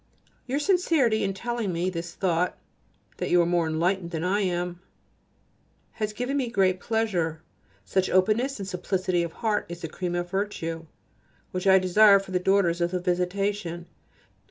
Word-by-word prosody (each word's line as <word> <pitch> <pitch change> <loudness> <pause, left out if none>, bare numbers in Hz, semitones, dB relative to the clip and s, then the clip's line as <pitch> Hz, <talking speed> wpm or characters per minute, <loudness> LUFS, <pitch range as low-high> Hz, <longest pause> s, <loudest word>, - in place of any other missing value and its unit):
Your 265 +2 -1
sincerity 295 - +2
in 195 -1 -1
telling 235 -1 -2
me 175 +2 -1
this 170 0 -6
thought 180 -1 0 0.6
(that - - -3
you 175 - +4
are 170 - +4
more 170 -1 +1
enlightened 170 +3 0
than 165 -2 -4
I 190 +3 +1
am) 175 -2 -2 1.1
has 215 -1 -3
given 250 +6 -2
me 255 -4 -1
great 190 -5 +2
pleasure. 180 -8 -1 0.4
Such 190 - 0
openness 220 +9 +2
and 195 -2 -6
simplicity 180 -1 -1
of 170 -1 -3
heart 215 0 -1
is 175 0 -7
the 165 - -3
cream 175 +2 -4
of 175 0 -2
virtue, 165 -5 -3 0.6
which 185 +1 -2
I 190 0 +7
desire 200 +2 +6
for 195 -1 -6
the 180 - +1
daughters 180 -2 +2
of 170 - +2
the 180 0 -2
Visitation. 180 0 -1
185 Hz, 165 wpm, -26 LUFS, 175-210 Hz, 1.1 s, I